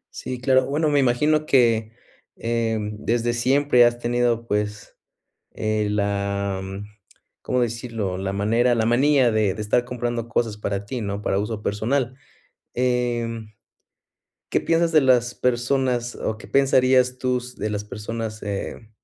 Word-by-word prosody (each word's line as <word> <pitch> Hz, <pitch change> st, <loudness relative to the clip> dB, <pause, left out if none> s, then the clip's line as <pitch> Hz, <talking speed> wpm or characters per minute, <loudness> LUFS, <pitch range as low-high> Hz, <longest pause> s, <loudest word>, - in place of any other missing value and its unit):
Sí, 125 Hz, -1 st, -5 dB
claro, 130 Hz, 0 st, +3 dB
bueno, 150 Hz, +2 st, +1 dB
me 145 Hz, -1 st, +3 dB
imagino 150 Hz, +5 st, +2 dB
que, 115 Hz, -4 st, +3 dB, 0.4 s
eh, 115 Hz, -1 st, -1 dB
desde 115 Hz, +3 st, -1 dB
siempre 130 Hz, +1 st, +3 dB
has 120 Hz, 0 st, +3 dB
tenido, 120 Hz, -1 st, 0 dB
pues, 105 Hz, -1 st, -3 dB, 0.6 s
eh, 110 Hz, -1 st, -1 dB
la, 100 Hz, -1 st, -1 dB
mm, 95 Hz, +2 st, -7 dB, 0.6 s
¿cómo 125 Hz, 0 st, 0 dB
decirlo? 115 Hz, -5 st, -2 dB
La 95 Hz, 0 st, -3 dB
manera 115 Hz, +5 st, +2 dB
la 110 Hz, -1 st, +1 dB
manía 130 Hz, +1 st, +4 dB
de 110 Hz, -3 st, +1 dB
de 105 Hz, -, -5 dB
estar 120 Hz, +3 st, +1 dB
comprando 120 Hz, -1 st, -3 dB
cosas 115 Hz, -3 st, -1 dB
para 100 Hz, -1 st, -3 dB
ti, 120 Hz, +3 st, -5 dB
¿no? 100 Hz, 0 st, -4 dB
Para 95 Hz, -, 0 dB
uso 105 Hz, +1 st, -3 dB
personal, 120 Hz, +5 st, -1 dB, 0.6 s
em, 120 Hz, -3 st, -1 dB, 1.0 s
¿qué -, -, +2 dB
piensas 165 Hz, 0 st, +1 dB
de 155 Hz, -, +6 dB
las 125 Hz, -2 st, +3 dB
personas, 125 Hz, 0 st, 0 dB
o 110 Hz, -, -3 dB
qué -, -, -13 dB
pensarías 130 Hz, -2 st, +3 dB
tú 125 Hz, -1 st, 0 dB
s 125 Hz, 0 st, -8 dB
de 105 Hz, -, -2 dB
las 105 Hz, 0 st, -3 dB
personas, 110 Hz, +1 st, -5 dB
eh 105 Hz, +2 st, -5 dB
120 Hz, 150 wpm, -23 LUFS, 105-125 Hz, 1.0 s, de